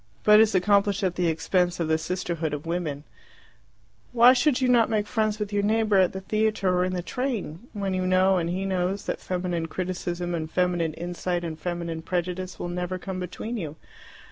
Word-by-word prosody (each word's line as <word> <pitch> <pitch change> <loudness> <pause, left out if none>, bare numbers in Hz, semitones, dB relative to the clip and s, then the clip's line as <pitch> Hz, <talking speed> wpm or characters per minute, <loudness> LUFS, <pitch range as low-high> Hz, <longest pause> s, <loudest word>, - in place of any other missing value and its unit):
But 210 0 +7
is 220 -2 +4
accomplished 200 +1 +3
at 185 -2 +1
the 175 -1 0
expense 175 +2 +1
of 165 - 0
the 160 0 +2
sisterhood 170 -3 -2
of 150 - -8
women. 165 -4 -3 1.1
Why 245 +1 +8
should 260 +1 +2
you 260 - +2
not 240 -3 +4
make 215 -2 +1
friends 215 -2 0
with 210 -1 -4
your 205 - +2
neighbour 215 0 +2
at 185 -2 +4
the 190 - -6
theatre 215 -1 0
or 180 - +2
in 185 0 -1
the 180 -1 -2
train, 235 - -4
when 200 -3 -2
you 185 0 0
know 185 0 +4
and 170 0 -2
he 185 +2 -2
knows 190 +1 -1
that - - -3
feminine 175 -2 -2
criticism 175 0 -3
and 160 -2 -3
feminine 175 -3 0
insight 175 +1 -3
and 160 -2 -5
feminine 170 -1 -4
prejudice 180 +2 -3
will - - -4
never 180 +1 -3
come 185 0 -5
between 185 +6 -5
you? 155 -7 -5
185 Hz, 195 wpm, -26 LUFS, 175-205 Hz, 1.1 s, Why